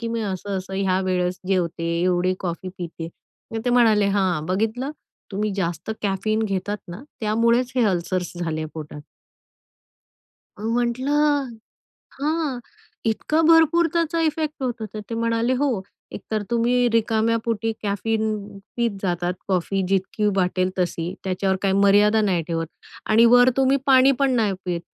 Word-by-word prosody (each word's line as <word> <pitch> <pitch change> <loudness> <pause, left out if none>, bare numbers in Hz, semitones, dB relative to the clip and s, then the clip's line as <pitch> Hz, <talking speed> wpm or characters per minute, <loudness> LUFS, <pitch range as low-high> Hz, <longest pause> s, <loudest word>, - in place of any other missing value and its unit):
की, 230 - -3
"मी 230 0 -2
असं-असं 190 -1 -4
ह्या 190 -1 +1
वेळेस 180 0 0
जेवते, 175 -3 0 0.2
एवढी 180 0 +2
कॉफी 180 0 -4
पिते." 165 -2 -6 0.4
मग 225 - -2
ते 245 - +1
म्हणाले, 225 -4 +4
"हां, 180 -6 +1
बघितलं, 220 - -1 0.4
तुम्ही 210 +1 -1
जास्त 170 0 -3
कॅफीन 215 +2 0
घेतात 200 0 -2
ना 180 +8 -8 0.2
त्यामुळेच 235 +3 +2
हे 245 - +4
अल्सर्स 180 0 -2
झाले 160 -2 -2
पोटात." 150 -2 -7 1.6
अ, - - -9
म्हटलं, 260 +5 +1 0.7
"हां, 300 -3 -1 0.5
इतका 265 +8 +1
भरपूर 325 +1 +5
त्याचा 335 0 0
इफेक्ट 310 -2 -1
होतो?" 240 -3 -3
तर 215 - -5
ते 230 - -3
म्हणाले, 230 +2 +1
"हो 255 -7 0 0.3
एक - - -6
तर 215 -1 0
तुम्ही 240 +1 +2
रिकाम्या 225 0 +2
पोटी 225 -1 -1
कॅफीन 215 +2 -1 0.5
पीत 235 -1 +1
जातात 175 -1 -1
कॉफी 195 +1 0
जितकी 195 +2 0
वाटेल 185 -1 +1
तशी, 175 -1 -1
त्याच्यावर 190 0 0
काही 195 -1 +1
मर्यादा 205 +2 +4
नाही 190 -5 +1
ठेवत 165 -1 -2 0.4
आणि 225 +2 +6
वर 245 +1 +7
तुम्ही 270 +1 +4
पाणी 265 -1 +6
पण 275 -1 +3
नाही 215 -4 +2
पीत." 175 -2 -2
215 Hz, 145 wpm, -23 LUFS, 185-245 Hz, 1.6 s, वर